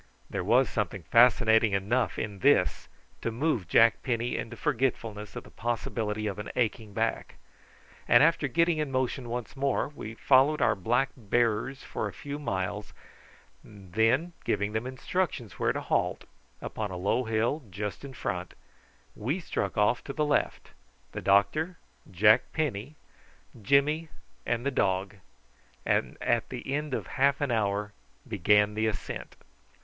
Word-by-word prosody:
There - - -2
was - - +4
something - - -3
fascinating 115 -3 +5
enough 105 +6 0
in 105 -2 -4
this 135 -8 +3 0.3
to - - -1
move 120 - -1
Jack 115 +6 +5
Penny 120 -1 -1
into 115 - -5
forgetfulness 115 -7 -2
of - - -6
the - - -16
possibility 110 -2 -2
of 105 -1 -3
an 105 - -5
aching 115 -3 -1
back; - - -1 0.7
and - - +7
after 160 -2 +3
getting 165 +3 +2
in 150 -3 -2
motion 130 -1 -1
once 120 0 -5
more, 140 0 0
we 115 -6 -8
followed 140 +5 +4
our - - +3
black 120 +7 0
bearers 120 +3 0
for - - -3
a - - -8
few 145 0 -6
miles, 100 -5 -3 0.7
and 95 -4 -15
then 125 - +2
giving 105 +1 -1
them 110 +3 -2
instructions 130 - -3
where - - +2
to - - -3
halt - - 0 0.4
upon 105 -2 -4
a 90 - -5
low 105 +7 0
hill 115 +7 0
just 100 +3 -5
in 140 -1 -8
front - - -4 0.6
we 135 - -2
struck 100 - -3
off 105 +4 +2
to 140 - -5
the 150 +1 0
left, 145 - -1 0.4
the - - -5
doctor, 155 - +2 0.3
Jack 105 +4 +4
Penny, 145 -3 -2 0.7
Jimmy, 145 +7 +2 0.4
and 120 +1 -1
the 140 - +1
dog, 100 -3 0 0.7
and - - 0
at 120 -1 0
the 130 +1 -5
end 150 -2 -1
of - - -4
half 140 +1 +1
an 145 -3 -1
hour 105 -1 0 0.3
began 105 0 +3
the 110 +1 0
ascent. 110 - -5
115 Hz, 155 wpm, -28 LUFS, 105-140 Hz, 0.7 s, and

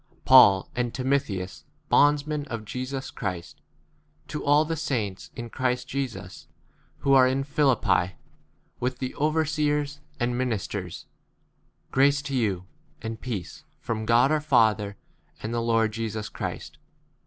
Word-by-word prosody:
PAUL 120 -8 +7
and 120 -1 -1
Timotheus, 125 -9 -1 0.2
bondsmen 145 0 +3
of 115 -4 -5
Jesus 130 +4 -5
Christ, 90 -6 -5 0.7
to 150 - -4
all 145 +2 +4
the 165 +1 -2
saints 120 - -3
in 120 -2 -7
Christ 125 -1 -1
Jesus 135 -3 -5 0.5
who 140 - +3
are 130 -1 +7
in 135 +1 0
Philippi, 135 -10 +2 0.7
with 125 0 -2
[the] 130 0 -4
overseers 150 -1 0 0.2
and 120 +1 +1
2 - - -2
ministers; 105 -7 -3
a - - -42
grace 140 +1 +4
to 140 -1 -3
you, 100 -7 0 0.4
and 110 0 -5
peace 110 -9 -5 0.2
from 110 -1 -4
God 120 +4 +5
our 155 -1 +2
Father 110 -8 +2 0.5
and 110 +2 -3
[the] 120 - 0
Lord 115 -1 +2
Jesus 110 -1 -4
Christ. - - -6
125 Hz, 135 wpm, -26 LUFS, 110-140 Hz, 0.7 s, PAUL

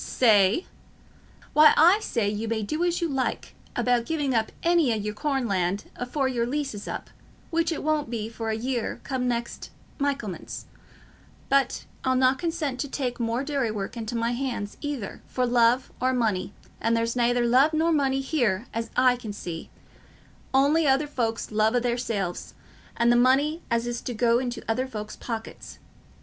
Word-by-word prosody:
"Say? 215 - +4 0.9
Why, 305 0 +7
I 350 +7 +7
say 235 - -1
you 210 +2 -2
may 220 -1 -1
do 305 +11 -2
as 350 0 0
you 340 - +1
like 270 -4 -2 0.2
about 245 -1 +1
giving 295 -5 0
up 220 -2 +1
any 335 -6 +3
o' - - +2
your 210 0 -3
corn 270 +1 -1
land 190 0 -1
afore 260 +2 -1
your 240 -2 0
lease 280 0 -2
is 205 0 -8
up, - - -6 0.4
which 335 0 +1
it 325 - -3
won't 305 -4 0
be 225 -3 -3
for 225 0 -5
a 220 - 0
year 245 0 -2
come 260 -2 -2
next 235 -1 -3 0.3
Michaelmas, 275 -9 -3 0.8
but 275 -2 +2 0.2
I'll 260 -1 +2
not 260 +1 +3
consent 320 -6 -2
to 285 - -2
take 255 -3 -3
more 235 +2 -1
dairy 280 -5 -1
work 205 0 -4
into 230 0 -4
my 230 0 0
hands, 240 -5 -3
either 285 -9 -4
for 255 - 0
love 240 +1 +3
or 255 +1 +2
money; 215 -7 0 0.3
and 230 0 +2
there's 230 +1 0
nayther 245 0 +2
love 260 +6 +5
nor 320 +1 +2
money 270 -3 +2
here, 240 -8 0
as 230 0 -3
I 255 -1 +5
can 220 -4 -6
see, 170 -5 -6 0.8
on'y 285 +4 +4
other 270 +2 +3
folks's 230 -7 -2
love 215 +2 +2
o' - - +4
theirselves, 230 -7 -2 0.4
and 235 0 +4
the - - +5
money 275 +7 +3
as 235 0 +1
is 240 0 -3
to 245 - -5
go 235 +1 +3
into 250 -1 -4
other 255 +4 0
folks's 215 -4 -7
pockets. 225 -2 -7
245 Hz, 180 wpm, -26 LUFS, 225-275 Hz, 0.9 s, Why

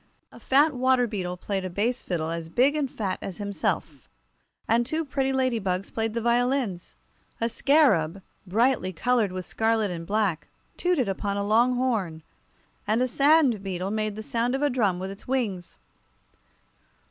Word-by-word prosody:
A - - -14
fat 290 +4 +3
water 255 -1 +3
beetle 185 -5 -4
played 195 +1 -3
a 185 - -3
bass 225 +8 -1
fiddle 165 -3 -3
as 165 -1 -5
big 260 - +3
and 290 -3 -1
fat 200 -6 -3
as 190 - -6
himself, 190 - -3 0.6
and 230 +2 +3
two 315 +6 -2
pretty 270 -1 -1
ladybugs 225 -8 -1
played 225 0 -2
the 230 - -1
violins. 240 -5 0 0.4
A 230 - +1
scarab, 210 - +2 0.2
brightly 220 -1 +1
colored 230 +2 +1
with 185 -1 -5
scarlet 220 -3 0
and 165 -1 -6
black, 200 -6 0 0.3
tooted 350 - +1
upon 200 +1 -2
a 200 - -1
long 235 +4 +3
horn, 210 -11 -1 0.6
and 215 +2 +2
a - - +1
sand 275 -4 +4
beetle 190 0 -3
made 215 -1 -2
the 220 - -6
sound 235 +3 0
of 275 - -2
a 290 - +2
drum 210 -8 +1
with 190 +2 -5
its 195 - -12
wings. 215 -9 -2
220 Hz, 165 wpm, -26 LUFS, 190-255 Hz, 0.6 s, sand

